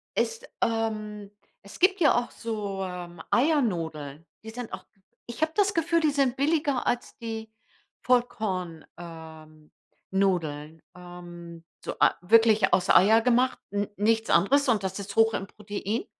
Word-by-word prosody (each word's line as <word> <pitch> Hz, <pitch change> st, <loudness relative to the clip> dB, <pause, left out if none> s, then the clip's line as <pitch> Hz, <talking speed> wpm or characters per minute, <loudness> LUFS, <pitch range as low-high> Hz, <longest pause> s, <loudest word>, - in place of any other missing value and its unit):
Es, 460 Hz, -, -1 dB, 0.2 s
ähm 215 Hz, -2 st, -2 dB, 0.3 s
es 200 Hz, -, -12 dB
gibt 380 Hz, +1 st, +3 dB
ja 295 Hz, -, +5 dB
auch 240 Hz, -, -6 dB
so, 205 Hz, -4 st, -4 dB
ähm, 175 Hz, -2 st, -7 dB
Eiernudeln. 165 Hz, -, 0 dB, 0.2 s
Die 220 Hz, -, -8 dB
sind 240 Hz, 0 st, -7 dB
auch -, -, -7 dB, 0.4 s
ich 235 Hz, +6 st, -8 dB
habe 315 Hz, 0 st, +2 dB
das 405 Hz, -1 st, +2 dB
Gefühl, 335 Hz, 0 st, +1 dB
die 310 Hz, -, +3 dB
sind 275 Hz, -3 st, +1 dB
billiger 290 Hz, -3 st, +1 dB
als 245 Hz, -, -2 dB
die 225 Hz, -1 st, -6 dB, 0.5 s
Vollkorn 195 Hz, -9 st, -1 dB
ähm, 160 Hz, -2 st, -12 dB, 0.4 s
nudeln. 160 Hz, -5 st, -1 dB
Ähm, 175 Hz, -1 st, -11 dB, 0.2 s
so -, -, -4 dB
ei -, -, +6 dB
wirklich 220 Hz, +2 st, +4 dB
aus 185 Hz, +1 st, +2 dB
Eier 220 Hz, +4 st, +6 dB
gemacht, 250 Hz, +2 st, +2 dB
n 205 Hz, 0 st, -1 dB
nichts 225 Hz, +2 st, +1 dB
anderes 275 Hz, +10 st, +3 dB
und 210 Hz, -5 st, +2 dB
das 190 Hz, +1 st, -3 dB
ist 200 Hz, 0 st, -7 dB
hoch 225 Hz, 0 st, +4 dB
im 195 Hz, -, -4 dB
Protein. 210 Hz, -, -4 dB
210 Hz, 150 wpm, -26 LUFS, 175-245 Hz, 0.5 s, ei